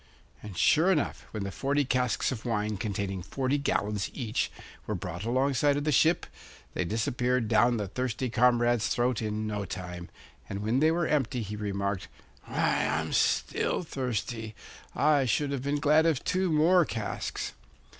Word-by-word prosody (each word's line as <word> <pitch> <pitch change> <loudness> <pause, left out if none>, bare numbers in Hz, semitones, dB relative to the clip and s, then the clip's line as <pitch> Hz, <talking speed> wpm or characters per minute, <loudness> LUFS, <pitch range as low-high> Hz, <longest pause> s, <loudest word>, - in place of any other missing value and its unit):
And 105 -4 -9
sure 170 +5 +4
enough, 155 -6 -1
when 105 -2 -4
the 100 - -4
forty 140 +6 0
casks 125 -1 +1
of 115 -4 -5
wine 105 -3 -1
containing 100 -2 -3
forty 135 +8 -1
gallons 105 -7 -1
each 115 -5 -1 0.4
were - - -1
brought 85 +5 -5
alongside 135 +3 +2
of 145 - -1
the 150 - +1
ship, 160 +4 +3 0.5
they - - -1
disappeared 120 +5 0
down 120 +2 +4
the 105 -2 -2
thirsty 125 +4 -2
comrade's 120 -1 +3
throat 120 -1 0
in 110 0 -2
no 105 -1 -2
time; 90 -2 -6 0.4
and 100 +1 -4
when 115 +5 +1
they 155 +2 +4
were 170 +1 +1
empty 135 -5 0
he 105 +1 -5
remarked: 100 -2 -2 0.4
'Why, - - +1
I'm 80 +1 -1
still - - +1
thirsty. 115 -6 -3 0.4
I 145 -2 +3
should 140 +4 +1
have 140 -3 -2
been 140 +2 -1
glad 150 +3 +4
of 155 -5 +1
two 185 -1 0
more 170 +4 +5
casks. 110 -8 -4
120 Hz, 165 wpm, -29 LUFS, 105-140 Hz, 0.5 s, more